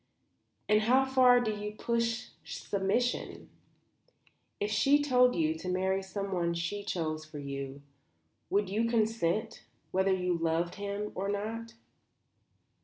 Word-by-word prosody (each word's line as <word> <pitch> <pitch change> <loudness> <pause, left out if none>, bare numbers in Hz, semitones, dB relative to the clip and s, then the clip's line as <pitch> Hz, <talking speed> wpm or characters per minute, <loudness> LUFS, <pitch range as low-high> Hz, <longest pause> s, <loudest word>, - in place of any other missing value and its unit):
"And 210 0 +4
how 255 +5 +4
far 255 -2 +6
do 230 -3 0
you 210 0 -5
push 235 +1 -1
submission? 200 +5 -2 1.1
If 205 +1 -1
she 275 +7 +4
told 250 -3 +4
you 160 -2 +2
to 180 - -5
marry 190 +1 +1
someone 190 -3 -2
she 175 +5 -3
chose 155 -5 -2
for 155 -1 -10
you, 140 0 -6 0.7
would 205 0 +2
you 215 +5 0
consent, 220 -2 0 0.3
whether 190 +1 +2
you 180 -1 +1
loved 165 +1 0
him 205 +1 -3
or 195 +2 -3
not?" 225 +3 -4
205 Hz, 125 wpm, -31 LUFS, 175-230 Hz, 1.1 s, far